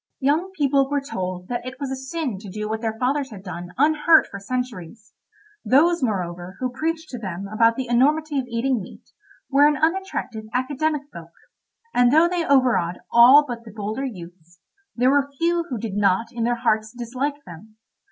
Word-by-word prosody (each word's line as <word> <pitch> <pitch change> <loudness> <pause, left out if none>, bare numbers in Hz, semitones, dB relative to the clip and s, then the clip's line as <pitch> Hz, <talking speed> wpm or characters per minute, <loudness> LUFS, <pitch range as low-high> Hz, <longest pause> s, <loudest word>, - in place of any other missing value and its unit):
Young 300 +7 +1
people 275 -2 +2
were 285 0 +1
told 185 -10 -5
that 240 -1 -3
it 255 +1 -8
was 275 -2 -4
a - - -1
sin 265 - -4
to 200 -1 -10
do 210 +3 -5
what 220 +1 -3
their 220 -1 -3
fathers 270 +3 0
had 200 -4 -11
done 175 -2 -7
unhurt 310 +3 +5
for 200 - -9
centuries; 225 -3 -6 0.5
those, 335 +6 +3
moreover, 180 -5 -3
who 255 -1 -2
preached 320 +4 -3
to 250 -2 -6
them 195 -2 -5
about 230 +2 +3
the 260 0 -4
enormity 290 +5 +2
of 255 - -4
eating 240 0 -1
meat, 185 - -13 0.4
were 285 +2 +6
an 295 -1 +1
unattractive 320 - -2
academic 285 +3 -1
folk, 165 -1 -10 0.6
and 245 0 +4
though 320 +4 +5
they 350 -1 -1
over 265 -5 +3
awed 175 +1 -4
all 255 +5 +8
but 235 -2 -6
the 225 - -12
bolder 215 +4 -4
youths, 175 -7 -9 0.4
there 250 +2 +3
were 280 0 +2
few 340 +1 +1
who 250 - -3
did 215 -2 -5
not 205 +3 +1
in 235 -2 -2
their 240 0 +1
hearts 220 -2 0
dislike 260 +4 -4
them. 195 +6 -13
245 Hz, 190 wpm, -23 LUFS, 210-285 Hz, 0.6 s, all